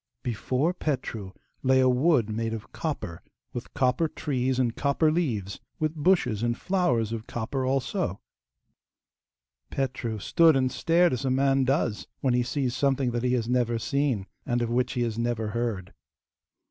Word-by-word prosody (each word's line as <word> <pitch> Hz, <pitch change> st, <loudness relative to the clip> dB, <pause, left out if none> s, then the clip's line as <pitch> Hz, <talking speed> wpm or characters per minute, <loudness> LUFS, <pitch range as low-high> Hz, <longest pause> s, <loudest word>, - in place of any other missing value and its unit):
Before 130 Hz, -, 0 dB
Petru 125 Hz, -, -3 dB, 0.3 s
lay 130 Hz, 0 st, +4 dB
a 130 Hz, -, +5 dB
wood 130 Hz, -1 st, +3 dB
made 115 Hz, +1 st, -2 dB
of 110 Hz, -, -9 dB
copper, 145 Hz, -, -4 dB, 0.3 s
with 120 Hz, -, -6 dB
copper 130 Hz, +3 st, +2 dB
trees 130 Hz, -4 st, -1 dB
and 120 Hz, -3 st, +1 dB
copper 145 Hz, +2 st, +2 dB
leaves, 115 Hz, -, -1 dB, 0.2 s
with 155 Hz, 0 st, 0 dB
bushes 150 Hz, -, +2 dB
and 120 Hz, 0 st, 0 dB
flowers 125 Hz, -, +1 dB
of 115 Hz, -1 st, -5 dB
copper 125 Hz, +3 st, -3 dB
also. 135 Hz, -, -1 dB, 1.5 s
Petru 125 Hz, -4 st, -2 dB
stood 165 Hz, -, +4 dB
and 130 Hz, -1 st, +2 dB
stared 170 Hz, +3 st, +3 dB
as 125 Hz, -, -2 dB
a 135 Hz, -, 0 dB
man 135 Hz, 0 st, +3 dB
does 130 Hz, -5 st, 0 dB
when 130 Hz, -3 st, +1 dB
he 125 Hz, -, +3 dB
sees 125 Hz, 0 st, -1 dB
something 135 Hz, -1 st, +1 dB
that 120 Hz, 0 st, -1 dB
he 125 Hz, 0 st, +1 dB
has 115 Hz, -3 st, 0 dB
never 120 Hz, -1 st, +1 dB
seen, 130 Hz, -4 st, 0 dB, 0.2 s
and 120 Hz, 0 st, 0 dB
of 115 Hz, -, -2 dB
which 125 Hz, +1 st, +1 dB
he 120 Hz, -, 0 dB
has 115 Hz, -1 st, -2 dB
never 115 Hz, -2 st, -1 dB
heard. 110 Hz, -5 st, -3 dB
125 Hz, 160 wpm, -27 LUFS, 115-140 Hz, 1.5 s, a